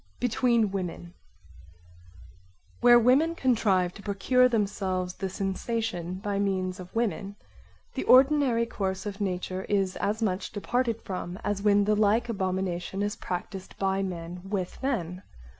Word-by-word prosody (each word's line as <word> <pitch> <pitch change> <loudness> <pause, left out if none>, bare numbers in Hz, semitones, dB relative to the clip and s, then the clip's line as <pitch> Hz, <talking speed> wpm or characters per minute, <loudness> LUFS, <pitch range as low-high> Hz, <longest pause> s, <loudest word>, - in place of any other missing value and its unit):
Between 235 -3 +2
women 180 -2 -5 1.7
Where 240 0 +7
women 270 +8 +4
contrive 200 - +2
to 200 - -11
procure 250 +6 +3
themselves 195 -5 -1
the 190 0 -4
sensation 195 -1 -3
by 200 +1 -3
means 190 -1 -1
of 180 +2 -11
women, 205 -3 -1 0.6
the - - -3
ordinary 260 -3 +5
course 190 -4 -3
of 205 0 -5
nature 185 -1 -2
is 195 -2 +1
as 215 +3 -1
much 185 -3 -2
departed 230 +2 -1
from 180 -1 -5
as 205 -1 -1
when 205 -1 +4
the 210 - +3
like 215 +3 +2
abomination 190 -2 -2
is 205 0 -1
practised 185 +1 -6
by 195 0 0
men 175 -2 -5
with 195 -2 -4
men. 185 -10 -2
200 Hz, 135 wpm, -27 LUFS, 185-230 Hz, 1.7 s, Where